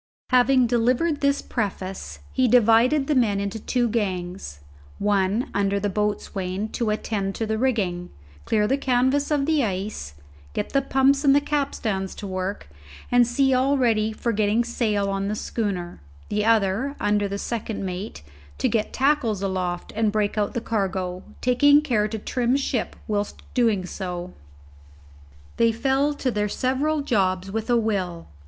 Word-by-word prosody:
Having 255 0 +5
delivered 250 +7 +1
this 280 0 +1
preface, 195 -4 -4 0.2
he 260 -1 +3
divided 245 +4 +4
the 300 - +1
men 220 -7 +2
into 200 +2 -3
two 245 +2 0
gangs; 185 - -3 0.4
one, 205 +3 +1
under 200 0 +1
the 205 0 -1
boatswain, 205 -1 -2
to 230 -1 -2
attend 205 -2 -2
to 225 - -2
the 220 0 -2
rigging, 195 -9 0 0.4
clear 210 -1 +2
the 270 +6 +1
canvas 260 +2 +2
of 290 -2 +1
the 310 -2 +2
ice, 190 - -4 0.4
get - - -2
the 275 - +2
pumps 275 +1 +2
and 275 -1 +5
the - - +6
capstans 270 -10 -2
to - - -7
work, 185 +1 -4 0.4
and 245 -1 +5
see 265 +2 +2
all 265 +2 +2
ready 220 -4 +2
for 235 +2 -2
getting 215 +2 +2
sail 215 -4 0
on 195 0 -1
the 210 - -1
schooner; 190 - -3 0.3
the 210 0 0
other, 225 +5 +2
under 205 0 +1
the 200 0 -4
second 220 -2 -4
mate, 185 - -6 0.3
to - - +1
get 220 -2 0
tackles 255 -8 +1
aloft 185 -2 -3
and 220 -1 +2
break 210 -1 0
out 210 -1 -1
the 235 - -1
cargo, 190 -5 -2 0.2
taking 285 +4 +5
care 240 -8 +1
to 220 +1 -4
trim 245 +3 0
ship 265 -4 -2
whilst 205 -1 -2
so - - -24
doing. 225 -6 +2 1.8
They 230 0 +4
fell 270 +5 +1
to 265 -3 -1
their 210 -1 -1
several 280 +7 0
jobs 195 -7 0
with 225 +3 -3
a 240 - +4
will. 190 -7 -1
220 Hz, 160 wpm, -24 LUFS, 200-255 Hz, 1.8 s, the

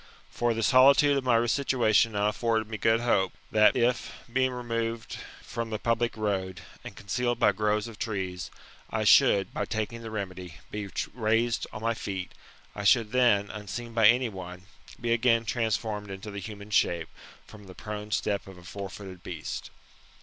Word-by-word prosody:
For 120 -1 0
the 115 - -1
solitude 140 +4 +6
of 135 - 0
my 120 -2 +3
situation 115 -4 +2
now 105 0 +2
afforded 110 0 0
me 110 -1 -6
good 115 +1 +3
hope, 95 -6 +1 0.2
that 110 -1 +5
if, 125 0 +1 0.2
being 130 0 +3
removed 115 -2 -3 0.2
from 115 -1 -4
the 110 - -2
public 115 +1 0
road, 95 -4 -2 0.2
and - - -9
concealed 120 +5 -1
by 115 -3 +4
groves 105 +2 0
of 115 -2 -11
trees, 95 -5 -3 0.4
I - - -1
shonld, 100 -1 +5
by - - -2
taking 110 +1 -3
the 115 - -7
remedy, 95 -5 -6 0.2
be 105 -1 -5 0.2
raised 115 0 +1
on 110 - -8
my 115 0 +1
feet, 95 -4 -5 0.4
I - - -9
then - - -6
should, 115 +3 +3 0.4
unseen 115 +3 -6
by 115 -2 +5
anyone, 95 -7 0 0.4
be 115 0 +1
again 115 -1 +3
transformed 110 -2 -2
into 95 +2 -7
the 100 - -5
human 105 +1 -9
shape, 85 -5 +1 0.4
from 105 -1 -14
the 95 - -11
prone 105 -1 -6
step 105 -2 -1
of 95 -1 -11
a 90 - -14
four 100 +2 -6
footed 95 -3 -10
beast. 85 -4 -6
110 Hz, 170 wpm, -28 LUFS, 100-115 Hz, 0.4 s, solitude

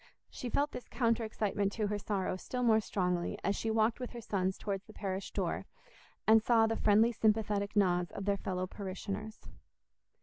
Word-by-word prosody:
She 245 - -5
felt 285 +5 +1
this 250 - -7
counter 230 -1 +1
excitement 205 -2 -1
to 215 - -1
her 205 0 -1
sorrow 195 -2 -1
still 250 +6 -4
more 220 -2 +5
strongly 180 -4 -1
as 200 - +1
she 225 - -2
walked 220 +2 +2
with 250 - -4
her 240 - -6
sons 190 -3 -1
towards 200 -1 -3
the 215 - -12
church 195 -2 -4
door, - - -2 0.6
and 220 0 +7
saw 225 0 +4
the 225 0 0
friendly 220 +3 +4
sympathetic 210 -2 +1
nods 180 -3 +2
of 195 - -5
their 200 -1 +2
fellow 185 -1 -2
parishioners. 200 +3 -6
210 Hz, 180 wpm, -33 LUFS, 195-225 Hz, 0.6 s, and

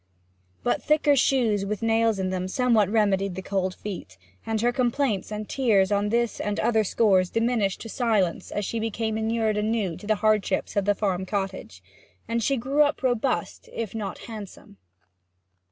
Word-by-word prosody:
But - - 0
thicker 300 -1 +3
shoes 240 -7 +2
with 210 +2 -3
nails 225 -1 +2
in 185 -1 -1
them 185 0 -2
somewhat 225 -2 +2
remedied 200 -3 +1
the 190 - -6
cold 190 -1 -1
feet, 180 - -7 0.3
and 220 -1 0
her 240 +1 +3
complaints 245 -5 0
and 210 0 -4
tears 210 -7 +2
on 205 0 +1
this 235 +1 0
and 205 0 -2
other 220 -2 +2
scores 190 -3 +3
diminished 230 -4 0
to - - -7
silence 215 -8 0
as 205 - -3
she 230 - -2
became 220 0 -2
inured 220 -1 0
anew 210 -4 0
to 205 - -11
the 215 - +3
hardships 210 -3 +1
of 200 -1 +1
the 205 0 +2
farm 190 -2 -1
cottage, 190 - -4 0.4
and 230 0 -1
she 275 +4 +1
grew 270 +5 +1
up 290 -1 +2
robust 255 - -1
if 225 -4 -4
not 215 -3 -4
handsome. 210 - -10
215 Hz, 170 wpm, -25 LUFS, 195-230 Hz, 0.4 s, thicker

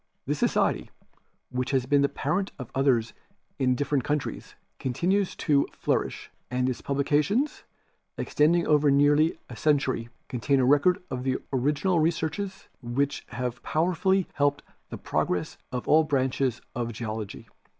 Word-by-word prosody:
This - - -2
society, - - +1 0.6
whicK 125 0 -1
has 130 -2 +2
been 140 +2 +3
the 140 - +3
parent 190 +8 -1
of 130 -4 -8
others 125 -4 +2 0.5
in 130 -1 +3
different 140 0 0
countries, 150 0 -3 0.2
continues 180 +10 0
to 145 -2 +2
flourish, - - -2 0.2
and 125 0 0
its 130 - -2
publications, 150 - 0 0.5
extending 165 +3 +2
over 150 -1 +4
nearly 145 +3 +4
a - - -9
century, 135 -6 +1 0.2
contain 135 +2 +1
a 130 - +3
record 145 +7 +4
of 130 0 -3 0.3
original 150 +7 +1
researches 165 +4 -1
which 135 +4 -1
have 125 0 -4
powerfully 180 +3 +1
helped 145 0 +1 0.3
the - - -6
progress 90 -2 -2
of 125 -1 -4
all 160 +1 +6
branches 135 -4 0
of 120 -1 -2
geology. 110 -2 -5
140 Hz, 135 wpm, -27 LUFS, 125-155 Hz, 0.6 s, all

